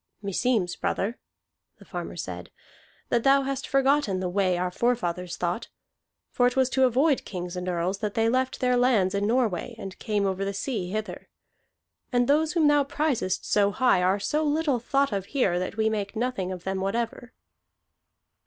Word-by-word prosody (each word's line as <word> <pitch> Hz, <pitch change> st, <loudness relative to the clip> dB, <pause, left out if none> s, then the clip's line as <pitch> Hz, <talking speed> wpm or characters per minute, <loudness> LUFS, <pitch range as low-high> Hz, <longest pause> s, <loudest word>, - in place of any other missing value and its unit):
"Meseems, 200 Hz, -1 st, 0 dB
brother," 220 Hz, +5 st, -2 dB, 0.6 s
the -, -, -16 dB
farmer -, -, -6 dB
said, -, -, -6 dB, 0.6 s
"that 235 Hz, -1 st, +1 dB
thou 275 Hz, 0 st, +5 dB
hast 275 Hz, 0 st, -3 dB
forgotten 275 Hz, -7 st, +2 dB
the 185 Hz, -1 st, -2 dB
way 185 Hz, -1 st, +1 dB
our 180 Hz, 0 st, -1 dB
forefathers 180 Hz, -6 st, -1 dB
thought. 175 Hz, +5 st, -2 dB, 0.6 s
For 245 Hz, -, +3 dB
it 250 Hz, -, -1 dB
was 260 Hz, -1 st, +2 dB
to 265 Hz, 0 st, +4 dB
avoid 265 Hz, +4 st, +2 dB
kings 180 Hz, -2 st, -6 dB
and 180 Hz, 0 st, -3 dB
earls 180 Hz, +2 st, -1 dB
that 210 Hz, -2 st, -3 dB
they 225 Hz, 0 st, +2 dB
left 255 Hz, +3 st, 0 dB
their 250 Hz, -1 st, +3 dB
lands 235 Hz, -7 st, +3 dB
in 200 Hz, +1 st, 0 dB
Norway 235 Hz, -2 st, 0 dB
and 195 Hz, -4 st, -8 dB
came 205 Hz, -2 st, 0 dB
over 190 Hz, 0 st, -1 dB
the 200 Hz, 0 st, -3 dB
sea 200 Hz, -4 st, -3 dB
hither. 215 Hz, +2 st, -5 dB, 0.8 s
And 245 Hz, -1 st, +2 dB
those 310 Hz, +2 st, +2 dB
whom 325 Hz, -4 st, +3 dB
thou 290 Hz, -1 st, +4 dB
prizest 275 Hz, -9 st, -1 dB
so 200 Hz, -1 st, +3 dB
high 205 Hz, -3 st, +3 dB
are 185 Hz, +3 st, +2 dB
so 300 Hz, +9 st, 0 dB
little 295 Hz, -3 st, +1 dB
thought 275 Hz, +3 st, +1 dB
of 195 Hz, -2 st, -2 dB
here 180 Hz, -9 st, +2 dB
that 185 Hz, +4 st, -4 dB
we 220 Hz, 0 st, +2 dB
make 210 Hz, -1 st, -2 dB
nothing 220 Hz, -6 st, -2 dB
of 180 Hz, -2 st, -6 dB
them 190 Hz, 0 st, -2 dB
whatever." 230 Hz, +4 st, -3 dB
220 Hz, 180 wpm, -26 LUFS, 190-260 Hz, 0.8 s, thou